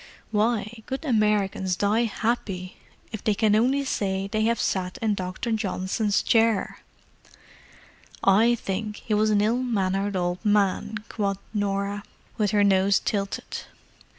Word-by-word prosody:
"Why, 220 Hz, 0 st, 0 dB
good 270 Hz, +4 st, -4 dB
Americans 210 Hz, -6 st, +1 dB
die 210 Hz, +5 st, +2 dB
happy 200 Hz, -5 st, -2 dB, 0.3 s
if 220 Hz, -, -6 dB
they 215 Hz, -3 st, +2 dB
can 215 Hz, 0 st, +3 dB
only 265 Hz, +5 st, +2 dB
say 195 Hz, -5 st, -1 dB
they 215 Hz, +1 st, 0 dB
have 230 Hz, 0 st, +1 dB
sat 180 Hz, -1 st, -1 dB
in 220 Hz, -2 st, +1 dB
Dr. 185 Hz, +4 st, -4 dB
Johnson's 205 Hz, 0 st, 0 dB
chair!" 225 Hz, -3 st, +2 dB, 1.4 s
"I 220 Hz, +5 st, +5 dB
think 210 Hz, 0 st, -4 dB
he 225 Hz, -, -1 dB
was 215 Hz, +1 st, +3 dB
an 210 Hz, -1 st, +3 dB
ill 230 Hz, +4 st, +1 dB
mannered 200 Hz, -4 st, 0 dB
old 175 Hz, +1 st, -1 dB
man!" 210 Hz, 0 st, +1 dB
quoth 200 Hz, -3 st, -2 dB, 0.2 s
Norah, 200 Hz, 0 st, -1 dB, 0.3 s
with 210 Hz, -3 st, +1 dB
her 205 Hz, +1 st, +3 dB
nose 195 Hz, 0 st, +4 dB
tilted. 200 Hz, -2 st, -3 dB
210 Hz, 135 wpm, -25 LUFS, 195-225 Hz, 1.4 s, I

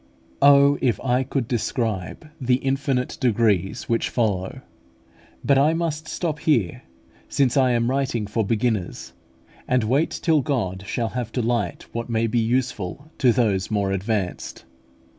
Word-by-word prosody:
Oh, 140 Hz, 0 st, +6 dB
if 120 Hz, -3 st, +1 dB
I 125 Hz, 0 st, +1 dB
could 130 Hz, -2 st, -2 dB
describe 115 Hz, -, -2 dB
the 125 Hz, 0 st, +3 dB
infinite 135 Hz, -1 st, -1 dB
degrees 110 Hz, -3 st, +1 dB
which 115 Hz, -1 st, 0 dB
follow! 100 Hz, -6 st, -1 dB, 0.8 s
But 140 Hz, -1 st, +4 dB
I 155 Hz, +4 st, +3 dB
must 160 Hz, -2 st, -2 dB
stop 160 Hz, -4 st, -3 dB
here, 120 Hz, -, +1 dB, 0.5 s
since 130 Hz, -4 st, +1 dB
I 130 Hz, -3 st, +4 dB
am 115 Hz, 0 st, +1 dB
writing 130 Hz, -4 st, -1 dB
for 110 Hz, +2 st, -1 dB
beginners, 110 Hz, -3 st, -2 dB, 0.5 s
and 125 Hz, -2 st, +2 dB
wait 135 Hz, +9 st, +2 dB
till 160 Hz, -4 st, +1 dB
God 100 Hz, -, -2 dB
shall 115 Hz, +2 st, -1 dB
bring 125 Hz, +1 st, -3 dB
to 115 Hz, +3 st, -3 dB
light 115 Hz, -6 st, -1 dB
what 115 Hz, +1 st, -5 dB
may 115 Hz, 0 st, +1 dB
be 115 Hz, +1 st, +1 dB
useful 125 Hz, -, -2 dB
to 125 Hz, -3 st, +5 dB
those 105 Hz, -6 st, +1 dB
more 100 Hz, -3 st, 0 dB
advanced. 95 Hz, -1 st, -3 dB
120 Hz, 145 wpm, -23 LUFS, 110-135 Hz, 0.8 s, Oh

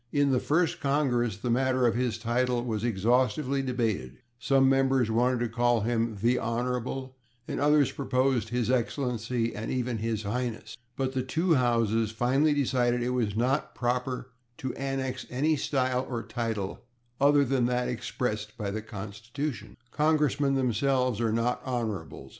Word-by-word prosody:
In 145 Hz, -1 st, +2 dB
the 130 Hz, -, +3 dB
First 165 Hz, +4 st, +1 dB
Congress 125 Hz, -7 st, +1 dB
the 120 Hz, +3 st, -2 dB
matter 130 Hz, +1 st, +2 dB
of 120 Hz, -, +3 dB
his 120 Hz, -2 st, -1 dB
title 120 Hz, +1 st, 0 dB
was 110 Hz, -3 st, -2 dB
exhaustively 125 Hz, +6 st, +1 dB
debated; 115 Hz, -, -2 dB, 0.2 s
some 135 Hz, +3 st, +3 dB
members 135 Hz, -3 st, +3 dB
wanted 120 Hz, +2 st, +2 dB
to 120 Hz, -, +1 dB
call 120 Hz, 0 st, +2 dB
him 115 Hz, 0 st, 0 dB
/the 120 Hz, +5 st, +1 dB
Honorable/ 125 Hz, +3 st, -2 dB, 0.3 s
and -, -, -3 dB
others 145 Hz, -1 st, +4 dB
proposed 130 Hz, -4 st, 0 dB
/His 120 Hz, 0 st, 0 dB
Excellency/ 120 Hz, -2 st, -1 dB
and 110 Hz, +2 st, -4 dB
even 125 Hz, -3 st, -1 dB
/His 110 Hz, -1 st, -2 dB
Highness/. 115 Hz, +2 st, -3 dB, 0.2 s
But 130 Hz, -1 st, -1 dB
the 130 Hz, -, 0 dB
two 160 Hz, +7 st, +1 dB
Houses 115 Hz, -4 st, +2 dB
finally 135 Hz, +7 st, +2 dB
decided 125 Hz, -3 st, +1 dB
that -, -, -1 dB
it -, -, 0 dB
was 120 Hz, -5 st, 0 dB
"not 130 Hz, +6 st, 0 dB
proper 125 Hz, +1 st, -2 dB, 0.3 s
to 130 Hz, -, -4 dB
annex 135 Hz, -1 st, -3 dB
any 150 Hz, +5 st, +1 dB
style 130 Hz, -2 st, 0 dB
or 120 Hz, -3 st, -3 dB
title 110 Hz, -5 st, -3 dB, 0.4 s
other 140 Hz, 0 st, +5 dB
than 125 Hz, -2 st, +1 dB
that 125 Hz, 0 st, 0 dB
expressed 115 Hz, -3 st, -3 dB
by 100 Hz, -3 st, -3 dB
the 110 Hz, +2 st, -3 dB
Constitution." 110 Hz, +2 st, -6 dB
Congressmen 150 Hz, -2 st, +2 dB
themselves 130 Hz, -1 st, +1 dB
are 115 Hz, -1 st, +1 dB
not 115 Hz, +2 st, 0 dB
/Honorables 110 Hz, -, -4 dB
125 Hz, 155 wpm, -28 LUFS, 115-130 Hz, 0.4 s, other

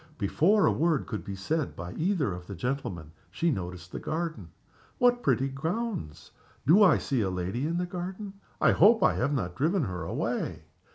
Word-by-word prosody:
Before 180 Hz, -, +3 dB
a -, -, +4 dB
word 160 Hz, -3 st, +1 dB
could 110 Hz, -3 st, -5 dB
be 100 Hz, -, -6 dB
said 150 Hz, +10 st, -2 dB
by 90 Hz, +1 st, -7 dB
either 160 Hz, -, 0 dB
of 90 Hz, 0 st, -9 dB
the 100 Hz, -, -6 dB
gentlemen 95 Hz, -, -4 dB, 0.2 s
she 170 Hz, 0 st, 0 dB
noticed 90 Hz, -, -5 dB
the -, -, -5 dB
garden. 160 Hz, -, -4 dB, 0.5 s
"What 245 Hz, 0 st, +3 dB
pretty 135 Hz, -, +2 dB
grounds! 160 Hz, -, -4 dB, 0.3 s
Do 175 Hz, +9 st, +6 dB
I 200 Hz, -, +7 dB
see 135 Hz, -5 st, -1 dB
a 95 Hz, -, 0 dB
lady 95 Hz, +9 st, -2 dB
in 170 Hz, +1 st, -1 dB
the 180 Hz, -, 0 dB
garden? 185 Hz, +3 st, -6 dB, 0.3 s
I -, -, +5 dB
hope 225 Hz, +2 st, +5 dB
I -, -, +5 dB
have 145 Hz, -, 0 dB
not 100 Hz, -11 st, -1 dB
driven 165 Hz, +5 st, +1 dB
her 90 Hz, -6 st, -4 dB
away." -, -, -3 dB
140 Hz, 185 wpm, -28 LUFS, -, 0.5 s, I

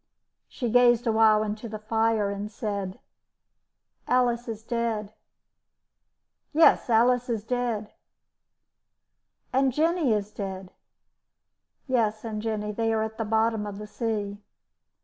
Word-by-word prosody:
She 245 Hz, -, -3 dB
gazed 240 Hz, 0 st, +5 dB
a 230 Hz, -, +2 dB
while 220 Hz, -1 st, +5 dB
into 215 Hz, +2 st, -5 dB
the 215 Hz, -, -5 dB
fire 220 Hz, -1 st, +1 dB
and 205 Hz, +1 st, -5 dB
said: 200 Hz, -3 st, -4 dB, 1.1 s
"Alice 245 Hz, -1 st, +2 dB
is 220 Hz, -1 st, -6 dB
dead." 225 Hz, -3 st, -2 dB, 1.4 s
"Yes, 315 Hz, -4 st, +5 dB
Alice 245 Hz, +2 st, +3 dB
is 225 Hz, -3 st, -1 dB
dead." 235 Hz, -3 st, -2 dB, 1.6 s
"And 265 Hz, 0 st, +3 dB
Jenny 315 Hz, 0 st, +1 dB
is 210 Hz, -1 st, 0 dB
dead." 190 Hz, -2 st, -6 dB, 1.2 s
"Yes, 220 Hz, -4 st, 0 dB
and 215 Hz, -2 st, -4 dB
Jenny. 210 Hz, -1 st, -2 dB
They 225 Hz, +1 st, 0 dB
are 220 Hz, -1 st, +1 dB
at 220 Hz, +1 st, -6 dB
the 225 Hz, -, -1 dB
bottom 220 Hz, 0 st, +1 dB
of 200 Hz, -1 st, -6 dB
the 210 Hz, -, -7 dB
sea." 210 Hz, -2 st, -3 dB
220 Hz, 125 wpm, -26 LUFS, 210-235 Hz, 1.6 s, gazed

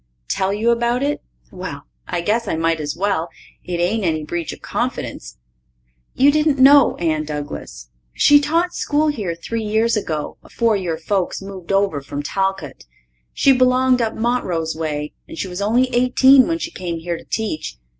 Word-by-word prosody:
Tell 190 Hz, 0 st, 0 dB
you 220 Hz, +4 st, +1 dB
about 240 Hz, +2 st, +1 dB
it? 290 Hz, +1 st, -1 dB, 0.3 s
Well, -, -, -7 dB, 0.2 s
I -, -, -2 dB
guess 220 Hz, +5 st, 0 dB
I 165 Hz, -, -1 dB
might 165 Hz, 0 st, 0 dB
as 150 Hz, -1 st, -3 dB
well. 180 Hz, -2 st, -1 dB, 0.3 s
It 175 Hz, -1 st, -4 dB
ain't 200 Hz, +5 st, 0 dB
any 160 Hz, -3 st, 0 dB
breach 170 Hz, +2 st, -4 dB
of -, -, -10 dB
confidence. -, -, -4 dB, 0.8 s
You 280 Hz, +2 st, +5 dB
didn't 300 Hz, -1 st, +2 dB
know 275 Hz, 0 st, +6 dB
Anne 155 Hz, -3 st, -1 dB
Douglas? 145 Hz, -, -7 dB, 0.2 s
She 290 Hz, -, +5 dB
taught 335 Hz, +4 st, 0 dB
school 300 Hz, -1 st, +1 dB
here 205 Hz, -, -3 dB
three 225 Hz, +7 st, -4 dB
years 220 Hz, +2 st, +1 dB
ago, 155 Hz, -8 st, -3 dB
afore 230 Hz, -2 st, 0 dB
your 175 Hz, -5 st, -2 dB
folks 185 Hz, +3 st, -1 dB
moved 195 Hz, -2 st, -8 dB
over 195 Hz, -7 st, +1 dB
from 145 Hz, +1 st, -6 dB
Talcott. 190 Hz, -4 st, -3 dB, 0.5 s
She 275 Hz, -, +3 dB
belonged 255 Hz, 0 st, +3 dB
up 225 Hz, -1 st, -1 dB
Montrose 185 Hz, -10 st, -1 dB
way 150 Hz, -2 st, -3 dB
and -, -, -10 dB
she 190 Hz, -, -3 dB
was 180 Hz, +1 st, -6 dB
only 235 Hz, +5 st, +2 dB
eighteen 255 Hz, +2 st, +5 dB
when 330 Hz, -, 0 dB
she 335 Hz, 0 st, -5 dB
came 175 Hz, -, -4 dB
here 170 Hz, +1 st, -4 dB
to -, -, -16 dB
teach. 210 Hz, -, -4 dB
200 Hz, 175 wpm, -20 LUFS, 165-250 Hz, 0.8 s, know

